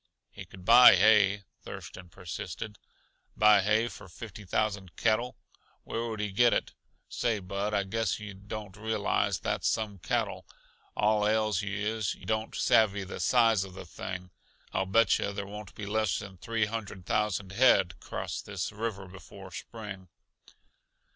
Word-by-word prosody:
"He 95 - -9
could 90 +1 -14
buy 120 -1 +9
hay," 100 0 +5 0.2
Thurston 90 -1 -9
persisted. 90 +5 -7 0.6
"Buy 105 -1 +6
hay 110 +4 +2
for 95 -3 -10
fifty 105 +2 -10
thousand 100 -3 -1
cattle? 115 +5 0 0.5
Where 115 +1 -3
would 110 -2 -5
he 105 -1 -2
get 120 +4 +4
it? - - -2 0.3
Say, 115 -3 0
Bud, 100 +2 -3
I 100 - +2
guess 110 0 -1
yuh 105 -1 -7
don't 100 0 -8
realize 110 +1 0
that's - - -1
some 105 -3 -1
cattle. - - -2 0.5
All 105 0 +3
ails 110 -2 +1
you 100 0 -3
is, 110 0 -1
yuh - - -15
don't 110 0 -2
savvy 105 -3 +3
the 95 - -7
size 115 -5 +4
uh 95 - -8
the 95 0 -10
thing. 90 +1 -7 0.4
I'll 95 - 0
bet 110 +2 +4
yuh 100 - -1
there 100 0 -4
won't 105 0 -9
be 105 - -6
less 110 0 0
than 95 -3 -9
three 115 +2 0
hundred 105 -4 -6
thousand 100 -2 0
head 95 -6 +4
cross - - -5
this - - -4
river 105 -3 -4
before 95 +1 -12
spring." 100 -2 -8
105 Hz, 160 wpm, -29 LUFS, 95-110 Hz, 0.6 s, buy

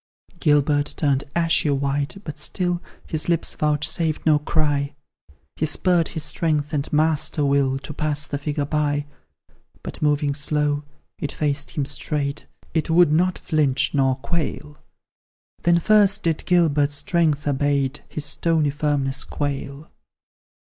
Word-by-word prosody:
Gilbert 145 0 +2
turned 140 -3 +1
ashy 165 -2 +3
white, 140 +3 -1
but 155 -3 -7
still 175 +3 0 0.2
His 155 +1 -1
lips 170 -2 +2
vouchsafed 155 +1 0
no 155 -2 +4
cry; 145 -2 0 0.6
He 155 - 0
spurred 175 +1 +2
his 160 - -5
strength 150 -1 -1
and 145 -1 -2
master 150 -1 +1
will 140 -1 +2
To 140 +2 -7
pass 150 -1 -1
the 140 +1 -4
figure 145 0 -2
by, 145 -1 0 0.8
But, - - -8
moving 145 -1 +1
slow, 145 0 -1 0.3
it 145 - -3
faced 145 +1 -2
him 145 - +1
straight, 145 0 -3 0.3
It 160 -1 0
would 170 -1 +5
not 180 +4 +2
flinch 145 -4 +1
nor 135 -2 +2
quail: 150 0 -4 0.8
Then 170 0 +4
first 210 +2 +4
did 165 -2 -1
Gilbert's 150 -5 +3
strength 160 -3 0
abate, 140 -1 0
His 150 - -3
stony 155 0 +1
firmness 145 -2 -1
quail. 140 +1 -4
150 Hz, 135 wpm, -22 LUFS, 145-160 Hz, 0.8 s, would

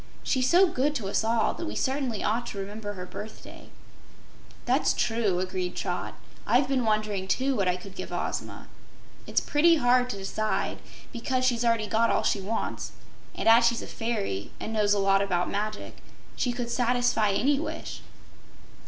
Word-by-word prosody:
She's 260 -1 +1
so 360 +3 +7
good 295 -2 0
to 205 -8 -2
us 205 - +1
all 225 0 +2
that 335 - -5
we - - -5
certainly 265 -5 -1
ought 235 +3 0
to - - -6
remember 205 +1 -5
her 180 -2 -7
birthday." 215 +4 -10 1.0
"That's - - +2
true," 225 -6 +1
agreed 185 -1 -3
Trot. 180 -2 -3 0.3
"I've 250 +5 +4
been 260 -3 +1
wondering, 215 -3 0
too, 260 +7 +1
what 195 -5 +1
I 180 - +2
could 185 +1 -10
give - - -7
Ozma. - - -4 0.6
It's - - +2
pretty 330 +3 +4
hard 250 -3 +3
to 200 - -4
decide, 215 +2 -2 0.4
'cause 255 0 +1
she's 240 -2 +2
got 240 - +2
already 225 -3 +1
all 230 +1 +3
she 200 - +1
wants, 215 +4 -3 0.4
and - - -2
as 230 +1 +7
she's 235 0 0
a - - -6
fairy 210 - -3
and 225 - -5
knows 210 -1 +3
a - - 0
lot 195 0 +3
about 180 -3 0
magic, 210 +1 -4 0.4
she 245 - 0
could 240 -1 -4
satisfy 245 -4 +2
any 275 +7 +2
wish." 320 - -5
225 Hz, 175 wpm, -27 LUFS, 200-250 Hz, 1.0 s, so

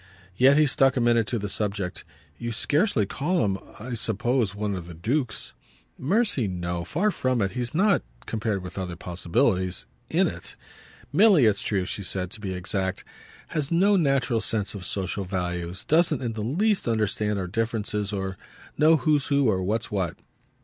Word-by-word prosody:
Yet 135 +5 +6
he 155 - +6
stuck 135 0 +3
a - - +3
minute 120 -2 +3
to 120 - 0
the 105 -1 -3
subject. 100 -2 -3 0.4
"You 120 0 -3
scarcely 145 - +1
call 150 - 0
him, 95 -1 -1 0.2
I 125 +3 -6
suppose, 115 -1 0
one 105 0 -2
of 90 -3 -5
the 85 - -9
dukes." 120 - -2 0.4
"Mercy, 185 - +1
no 90 -2 -3
far 185 - 0
from 130 -7 0
it. 100 -2 +1
He's 125 +3 -3
not, 200 +4 +4 0.2
compared 110 -4 -2
with 90 +2 -6
other 90 -2 -4
possibilities, 90 +2 0 0.2
'in' - - +3
it. - - -5 0.6
Milly, 190 - +6
it's 105 -2 +3
true," 95 -3 0
she 100 - -4
said, 90 -1 -3
to 110 -1 -6
be 100 -3 -3
exact, 95 +1 -2 0.5
"has 150 -3 -1
no 195 +5 +4
natural 135 - +2
sense 105 0 -1
of 100 -3 -6
social 95 0 -2
values, 90 -1 -3
doesn't 160 -3 +3
in 115 -2 -2
the 110 - -4
least 190 - +1
understand 105 -2 0
our 95 - -2
differences 105 0 -2
or 95 -2 -3 0.4
know 160 +2 +6
who's 150 -3 +1
who 140 -2 +3
or 95 -3 +1
what's 105 +5 -1
what." 95 -5 -1
110 Hz, 175 wpm, -26 LUFS, 95-135 Hz, 0.6 s, Yet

